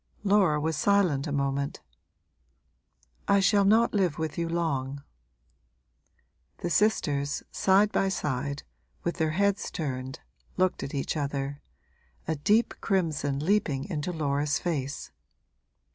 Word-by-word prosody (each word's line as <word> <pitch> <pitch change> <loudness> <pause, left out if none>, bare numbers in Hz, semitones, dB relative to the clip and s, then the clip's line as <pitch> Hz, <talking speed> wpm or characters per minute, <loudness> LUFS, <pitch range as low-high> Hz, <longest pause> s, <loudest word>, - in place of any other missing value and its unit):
Laura 195 -7 +3
was 160 +1 -1
silent 165 -4 +2
a - - -3
moment. 140 0 -1 1.5
'I 200 - +5
shall 200 +1 +4
not 225 +4 +4
live 185 -7 +1
with 160 -2 -3
you 170 -1 -2
long.' 140 -5 -2 1.5
The 175 - -3
sisters, 145 -10 +1
side 200 +2 +3
by 195 - +1
side, 140 -4 -2 0.4
with 170 - -2
their 160 -2 +1
heads 200 +3 +1
turned, 130 -4 -4 0.4
looked 185 0 +1
at 140 - -5
each 140 - -2
other, 140 -1 -3 0.7
a 160 - 0
deep 210 +11 +2
crimson 155 -7 0
leaping 165 -9 +1
into 155 0 -2
Laura's 150 -1 0
face. 140 -6 -3
160 Hz, 120 wpm, -28 LUFS, 140-190 Hz, 1.5 s, I